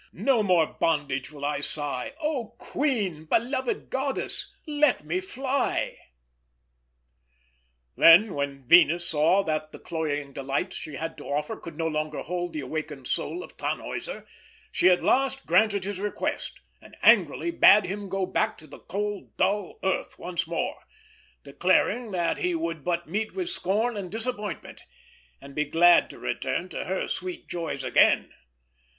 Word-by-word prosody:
No 265 -5 +2
more 180 -5 +4
in - - -20
bondage 145 -4 0
will 145 -1 -6
I 145 0 -1
sigh! 145 - -1
Oh 265 -8 -3
queen, 205 - -1
beloved 250 - -1
goddess, 270 0 -2
let 295 - +2
me 170 +4 -1
fly!" 260 +7 -1 2.0
Then, 180 +5 +7
when 140 -1 -3
Venus 175 +1 +6
saw 165 +6 +3
that 155 -2 -2
the - - -10
cloying 145 -4 -3
delights 140 +8 -2
she 155 - -6
had 165 +3 -5
to - - -10
offer 150 +1 -2
could 165 -3 -10
no 165 - -1
longer 155 -1 -2
hold 175 0 -3
the 155 - -3
awakened 145 -1 -5
soul 360 - -2
of - - -13
Tannhäuser, - - -4 0.5
she 185 - +4
at 180 - +3
last 270 +1 +1
granted 205 -3 +3
his 200 -1 -4
request, 205 +1 -3 0.2
and - - -16
angrily 340 - +4
bade 210 -9 +6
him 200 +1 -5
go 195 0 -1
back 190 - 0
to 155 - -11
the - - -13
cold 205 0 -5
dull 200 0 0
earth 190 0 -1
once 175 0 -3
more, 170 - -2 0.6
declaring 240 -2 +1
that 175 -4 0
he 180 -1 0
would 165 -2 -3
but 175 -1 -1
meet 215 +6 -3
with 370 -1 -2
scorn 220 - 0
and 195 -3 -5
disappointment, 220 -3 -5 0.6
and 140 0 -12
be 150 - +1
glad 170 +4 +5
to - - -11
return - - -2
to - - -5
her - - -2
sweet 360 -2 -5
joys 170 -2 -4
again. - - +4
180 Hz, 155 wpm, -26 LUFS, 155-220 Hz, 2.0 s, Then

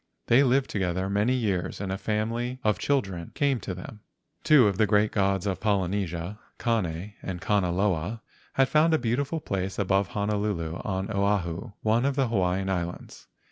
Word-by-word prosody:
They 125 +4 +5
lived 135 0 +2
together 95 -1 -1
many 105 +6 +2
years 100 -8 -1
and 95 -1 -3
a 95 - -1
family 115 +4 -2
of 105 -3 +2
children 95 -12 -1
came 140 -4 +1
to 95 - -5
them. 100 +4 -9 0.4
Two 140 -7 +6
of 100 0 -1
the 110 - +4
great 105 +1 +3
gods 95 -2 +1
of 95 -2 -1
Polynesia, 95 -2 -1 0.2
Kane 100 -4 -1
and 90 -2 -5
Kanaloa, 95 +1 0 0.3
had 135 0 +3
found 160 +2 +4
a - - +3
beautiful 140 +6 -1
place 95 -7 -3
above 100 -1 +2
Honolulu 100 -5 -2
on 95 +2 -3
Oahu, 100 0 -1
one 115 +3 +2
of 140 -1 +1
the 135 -4 +1
Hawaiian 95 -3 0
Islands. 90 -2 -4
100 Hz, 165 wpm, -27 LUFS, 95-115 Hz, 0.4 s, Two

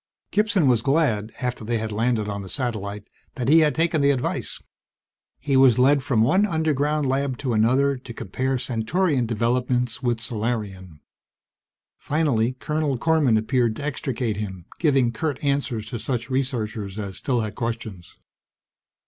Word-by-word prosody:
Gibson 205 -5 +2
was 120 -3 +3
glad, 130 -6 +1
after 125 -2 -2
they 115 +2 -1
had 110 0 -3
landed 110 0 0
on 100 -1 -3
the 95 - -9
satellite, 105 -5 -3 0.3
that 125 -3 -3
he 160 +2 +7
had 150 -2 +3
taken 165 -1 +1
the 140 - +4
advice. 130 -3 -1 0.8
He 140 0 -1
was 130 -3 +6
led 135 +3 +4
from 115 -4 +2
one 185 - +3
underground 155 -5 +1
lab 135 -1 0
to 130 -3 -2
another, 130 +6 +3
to 125 -1 -11
compare 130 +5 -2
Centaurian 125 +3 0
developments 120 +2 0
with 120 -3 0
Solarian. 105 -7 -4 1.0
Finally, 135 -6 +1
Colonel 150 +1 -1
Korman 145 -4 +3
appeared 115 0 +1
to 145 - -6
extricate 130 -6 -2
him, 95 -5 -6
giving 135 -7 +3
curt 145 +3 -2
answers 140 -6 -1
to 120 - -4
such 120 0 -3
researchers 110 -6 -2
as 100 -3 -5
still 125 -4 0
had 110 -2 -4
questions. 110 -6 -5
125 Hz, 150 wpm, -24 LUFS, 110-140 Hz, 1.0 s, he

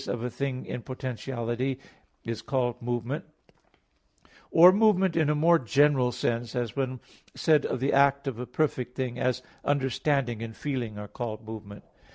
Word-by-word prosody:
of 120 -1 -3
a 125 - -3
thing 135 -1 -3
in 125 - -5
potentiality, 130 0 -3 0.4
is 115 -1 -4
called 125 -3 -1
movement; 120 +3 -2 1.3
or 175 +2 +8
movement 195 -3 +3
in 160 -3 +2
a 150 - +2
more 165 +3 +5
general 135 -1 +3
sense, 120 0 -2
as 120 -3 -2
when 130 -2 -2 0.4
said 155 -3 +3
of - - -2
the 135 +3 +1
act 140 0 +4
of 130 -4 -4
a 125 - -5
perfect 125 -3 -1
thing, 125 -2 -3
as 125 -1 0 0.2
understanding 135 -3 0
and 115 -1 -6
feeling 125 -7 -3
are 105 0 -6
called 110 0 -6
movement. 105 -2 -9
130 Hz, 160 wpm, -28 LUFS, 120-140 Hz, 1.3 s, or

